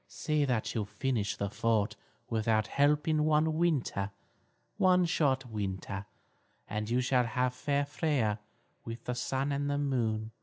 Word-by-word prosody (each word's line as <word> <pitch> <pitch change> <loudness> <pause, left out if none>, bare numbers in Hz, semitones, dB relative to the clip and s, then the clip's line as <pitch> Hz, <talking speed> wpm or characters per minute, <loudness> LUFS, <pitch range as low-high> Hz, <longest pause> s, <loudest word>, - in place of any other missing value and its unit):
See 155 -2 0
that 125 -5 0
you 110 - 0
finish 105 0 -1
the 100 0 -3
fort 110 -2 +1 0.3
without 110 -1 +1
help 145 +5 +2
in 155 -1 +3
one 155 +1 +3
winter, 140 - +1 0.7
one 180 -1 +5
short 140 -6 +1
winter, 100 -3 -4 0.6
and 105 +1 -3
you 125 +2 +2
shall 125 -1 +2
have 125 +2 0
fair 140 +2 0
Freia 140 -8 0 0.4
with 115 0 -7
the 125 - -2
Sun 135 +3 -1
and 140 0 -1 0.2
Moon. 110 -4 0
125 Hz, 145 wpm, -31 LUFS, 110-145 Hz, 0.7 s, one